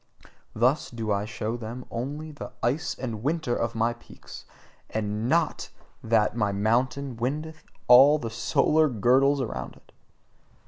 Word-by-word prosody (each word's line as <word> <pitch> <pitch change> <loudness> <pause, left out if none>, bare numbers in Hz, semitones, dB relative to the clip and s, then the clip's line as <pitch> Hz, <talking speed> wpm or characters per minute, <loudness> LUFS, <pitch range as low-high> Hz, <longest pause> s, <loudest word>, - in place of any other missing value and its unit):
Thus 125 +7 +2
do 115 -3 -4
I 100 0 0
show 110 +1 -4
them 120 +2 -7
only 145 +6 -5
the 145 - -9
ice 140 +8 0
and 115 -5 -5
winter 145 -2 -1
of 115 0 -2
my 115 +1 +1
peaks 120 - -13 0.4
and 110 +2 -2
NOT 165 0 0 0.3
that 110 -1 +2
my 105 -4 0
mountain 120 +5 0
windeth 155 +6 -4 0.2
all 135 +5 +8
the 115 -6 -5
solar 150 +7 +2
girdles 135 +5 +3
around 120 - -5
it! - - -23
120 Hz, 140 wpm, -26 LUFS, 110-140 Hz, 0.4 s, all